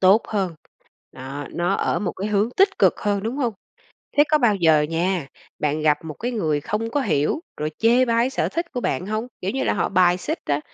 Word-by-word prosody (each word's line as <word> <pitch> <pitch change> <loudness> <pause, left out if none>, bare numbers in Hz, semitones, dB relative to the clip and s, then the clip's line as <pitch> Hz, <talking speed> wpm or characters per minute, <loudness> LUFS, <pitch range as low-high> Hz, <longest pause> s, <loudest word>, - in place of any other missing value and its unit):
tốt 195 +4 +5
hơn, 190 -5 -1 0.6
đó 135 +2 -7
nó 175 +1 0
ở - - 0
một 185 -3 -2
cái 200 +3 -4
hướng 210 +2 +2
tích 390 +1 +3
cực - - +3
hơn, 205 -2 0
đúng 230 +5 -3
hông? 240 -6 -1 0.6
Thế 290 - +8
có 305 - +5
bao 235 -7 +3
giờ 160 -4 +4
nha, 165 0 -1 0.3
bạn 150 +1 0
gặp 150 -1 +3
một 155 - -5
cái 245 +9 -4
người 155 -10 0
không 220 +6 -2
có 290 - +1
hiểu 155 - 0 0.2
rồi 150 +1 -2
chê 240 +3 +4
bai 235 +2 +2
sở - - -1
thích 335 +1 -2
của 245 - -2
bạn 180 - -1
hông? 215 +4 -3
Kiểu 190 - -1
như 265 - -1
là, - - +1
họ 185 - 0
bài 180 -1 +4
xích 315 - -3
á. 145 0 +1
195 Hz, 230 wpm, -22 LUFS, 160-235 Hz, 0.6 s, Thế